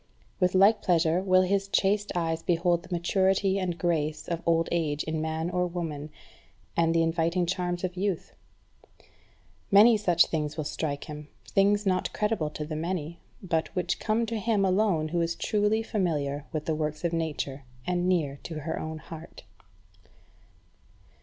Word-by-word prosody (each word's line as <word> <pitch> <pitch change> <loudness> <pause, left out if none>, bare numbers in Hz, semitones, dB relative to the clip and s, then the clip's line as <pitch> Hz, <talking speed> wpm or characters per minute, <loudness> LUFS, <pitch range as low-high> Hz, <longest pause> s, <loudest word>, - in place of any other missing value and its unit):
With 180 0 +2
like 200 +4 +5
pleasure 170 0 +2
will 185 -1 +4
his 195 +1 0
chaste 205 +1 +1
eyes 165 -2 -1
behold 175 0 +1
the 185 - -16
maturity 190 +2 +2
and 180 -3 -2
grace 155 -3 -1
of 170 -1 -2
old 165 0 +3
age 155 -4 0
in 160 0 -2
man 160 +2 -2
or 180 0 +1
woman, 160 -4 -5 0.7
and 165 0 +2
the 165 - +4
inviting 165 +2 +1
charms 175 0 -2
of 180 -1 -2
youth. 190 -2 -2 1.4
Many 215 +3 +7
such 175 -5 +4
things 150 -1 -3
will 155 - -1
strike 145 -1 -3
him, 150 -1 -8 0.2
things 205 +1 +3
not 185 -1 +1
credible 210 -7 0
to 150 0 -5
the 155 0 -5
many, 170 0 -3 0.2
but 165 -3 0
which 180 -1 -1
come 225 +1 +1
to 225 0 -3
him 210 -2 +1
alone 185 -5 +2
who 170 +1 0
is 165 0 -1
truly 210 +3 +1
familiar 150 -9 -1
with 155 -2 -3
the 160 - 0
works 155 0 -3
of 170 -1 0
Nature 150 -4 -3 0.2
and 180 0 0
near 150 -6 0
to 160 -2 -6
her 160 +3 -3
own 160 0 -5
heart. 160 +1 -11
170 Hz, 165 wpm, -28 LUFS, 160-190 Hz, 1.4 s, Many